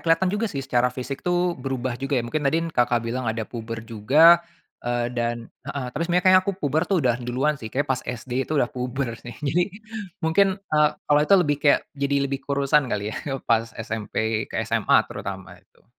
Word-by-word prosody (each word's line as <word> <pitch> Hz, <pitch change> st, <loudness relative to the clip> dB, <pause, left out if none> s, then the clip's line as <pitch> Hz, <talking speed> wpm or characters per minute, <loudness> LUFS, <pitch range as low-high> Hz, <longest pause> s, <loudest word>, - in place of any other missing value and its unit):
kelihatan 170 Hz, +3 st, +2 dB
juga 210 Hz, +2 st, 0 dB
sih 140 Hz, -7 st, -4 dB
secara 125 Hz, -2 st, +2 dB
fisik 130 Hz, +2 st, -6 dB
tuh 175 Hz, 0 st, +1 dB
berubah 130 Hz, -1 st, -3 dB
juga 135 Hz, +1 st, -1 dB
ya. 120 Hz, -, 0 dB
Mungkin 155 Hz, +6 st, -2 dB
tadi 165 Hz, +3 st, +1 dB
Kakak 120 Hz, -2 st, +2 dB
bilang 120 Hz, +1 st, -2 dB
ada 110 Hz, 0 st, -2 dB
puber 115 Hz, 0 st, -7 dB
juga, 140 Hz, +10 st, +5 dB, 0.4 s
eee 120 Hz, 0 st, -1 dB
dan 120 Hz, -1 st, -3 dB, 0.2 s
heeh, 140 Hz, -1 st, -3 dB
tapi 150 Hz, -, -5 dB
sebenernya 180 Hz, +2 st, +2 dB
kayaknya 185 Hz, 0 st, +7 dB
aku 195 Hz, -, -1 dB
puber 155 Hz, +1 st, 0 dB
tuh 195 Hz, -, +2 dB
udah 125 Hz, 0 st, +2 dB
duluan 130 Hz, +5 st, -1 dB
sih, 110 Hz, -, -6 dB
kayaknya 135 Hz, +4 st, -2 dB
pas 130 Hz, -, -2 dB
SD 120 Hz, +1 st, -6 dB, 0.2 s
tuh 155 Hz, -, -1 dB
udah 125 Hz, -3 st, +2 dB
puber 125 Hz, 0 st, -3 dB
sih, 120 Hz, -2 st, -10 dB
jadi 175 Hz, +6 st, +3 dB, 0.6 s
mungkin, 190 Hz, +4 st, +3 dB, 0.2 s
eee, 150 Hz, 0 st, +5 dB, 0.2 s
awalnya 150 Hz, +1 st, +4 dB
tuh -, -, +5 dB
lebih 145 Hz, -1 st, +1 dB
kayak 145 Hz, -1 st, +4 dB
jadi 140 Hz, 0 st, -1 dB
lebih 135 Hz, 0 st, -3 dB
kurusan 140 Hz, 0 st, +2 dB
kali 105 Hz, -1 st, -2 dB
ya -, -, -6 dB, 0.3 s
pas 115 Hz, 0 st, +2 dB, 0.2 s
SMP 110 Hz, 0 st, -2 dB
ke -, -, -6 dB
SMA -, -, +2 dB
terutama, -, -, -7 dB
itu. -, -, -31 dB
135 Hz, 200 wpm, -24 LUFS, 120-150 Hz, 0.6 s, kayaknya